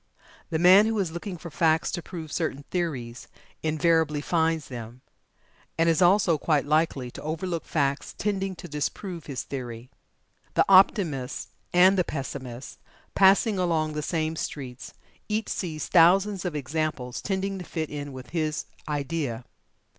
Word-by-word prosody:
The 165 - 0
man 185 +5 +7
who 225 0 0
is 190 -5 0
looking 175 +2 -6
for 170 0 -9
facts 160 +1 +2
to 175 - -3
prove 160 -4 -8
certain 145 -4 -2
theories, 130 -10 -3 0.3
invariably 155 -1 +2
finds 160 0 0
them, 120 0 -8 0.8
and 165 0 +3
is 165 +1 +3
also 180 -3 +4
quite 145 -2 +1
likely 145 -4 +1
to - - -9
overlook 165 +2 -3
facts 140 -2 -1
tending 195 -2 -1
to 175 - -9
disprove 165 +3 -4
his 140 -3 -4
theory. 125 -2 -7 0.6
The - - +4
Optimist 185 - +3 0.2
and 185 +2 +5
the - - +4
Pessimist 130 -4 -6 0.3
passing 195 +1 +4
along 160 -4 +1
the 150 - -2
same 160 0 -1
streets, 130 -5 -6 0.3
each 215 +1 -1
sees 160 -5 -3
thousands 190 +3 +4
of 175 -4 -2
examples 145 -3 -3
tending 195 0 -2
to - - -6
fit 160 -2 -4
in 145 -1 -5
with 130 -1 -10
his 155 -2 -1 0.2
idea. 140 -5 -2
160 Hz, 145 wpm, -26 LUFS, 145-180 Hz, 0.8 s, man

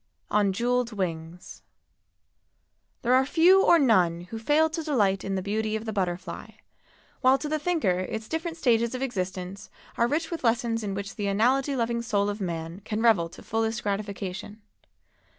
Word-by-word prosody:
ON 205 -2 +3
JEWELLED 240 +3 0
WINGS. 170 -3 -5 1.4
There 245 +1 +3
are 260 +1 +5
few 355 +7 +5
or 340 - +6
none 185 - +3
who 225 - -5
fail 295 +7 +3
to 320 +1 -4
delight 205 - +1
in 195 0 -2
the 190 - -2
beauty 215 +2 -1
of 220 +1 -4
the 220 - -3
butterfly, 180 -2 -4 0.7
while 260 +1 +5
to 300 - -5
the 310 +1 -1
thinker 295 - +1
its 215 +4 -4
different 330 +1 -4
stages 235 -4 +2
of 255 - -3
existence 190 -3 -4 0.3
are 235 - +4
rich 320 +6 -1
with 335 - -4
lessons 230 -1 +1
in 200 -2 -3
which 200 0 -6
the 205 -2 -2
analogy 255 +8 +2
loving 235 -1 -1
soul 205 -3 0
of 205 +1 -4
man 165 -1 -4
can 215 +1 -3
revel 195 -8 +4
to - - -13
fullest 225 +1 -1
gratification. 200 0 -4
220 Hz, 170 wpm, -26 LUFS, 195-255 Hz, 1.4 s, or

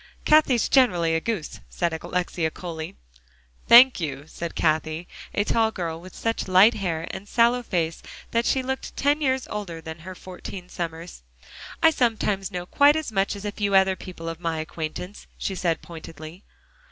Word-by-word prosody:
"Cathie's 300 -6 +4
generally 175 -11 +3
a 165 - +1
goose," 210 -7 -3
said 170 -2 -1
Alexia 175 -2 -1
coolly. 160 -1 -7 0.7
"Thank 245 +1 +8
you," 140 -4 -4
said 170 +1 -6
Cathie, 160 +1 0 0.2
a 205 - +1
tall 225 +1 +2
girl, 170 -6 -4
with 185 +1 -12
such 225 -3 -2
light 190 +5 +6
hair 165 -5 -2
and 190 +2 -8
sallow 235 +2 +3
face 170 -8 -2 0.3
that 230 +1 +1
she 265 - +1
looked 265 +1 -4
ten 290 +2 +2
years 260 -3 0
older 195 -6 -5
than 160 0 -8
her 185 +3 -9
fourteen 180 0 -9
summers. 165 - -6 0.6
"I 325 - +7
sometimes 215 -7 0
know 180 -3 -5
quite 285 +9 +5
as 315 -6 -3
much 195 0 0
as 200 +1 -8
a 205 - -2
few 200 -1 -1
other 190 0 +5
people 175 -3 -9
of 165 0 -5
my 165 -2 -2
acquaintance," 165 +5 -6
she 195 - -3
said 175 -3 -1
pointedly. 165 +2 -10
185 Hz, 170 wpm, -25 LUFS, 165-225 Hz, 0.7 s, Thank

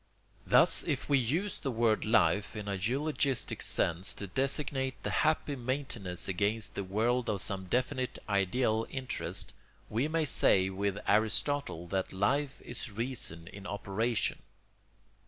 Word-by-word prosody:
] - - -34
Thus - - +6
if - - -2
we 140 -1 +4
use 165 - -1
the 140 - -3
word 115 -2 +2
life 105 -1 +3
in 105 -1 -5
a 100 - -1
eulogistic 135 +6 0
sense 85 +3 +1
to 100 - -5
designate 130 - -1
the - - -1
happy 155 -2 +1
maintenance 120 -8 -3
against 105 +3 -1
the 100 - -3
world 115 +6 0
of 105 -2 0
some 95 0 -2
definite 130 +5 -1
ideal 110 +3 +1
interest, 130 -2 -5 0.4
we 120 +7 +1
may 160 0 +1
say 95 -8 +4
with 100 +1 -1
Aristotle 110 - +1
that 95 0 -1
life 135 +9 0
is 120 -1 -6
reason 110 -7 -1
in 100 0 -9
operation. 105 +3 -1
115 Hz, 140 wpm, -31 LUFS, 100-130 Hz, 0.4 s, Thus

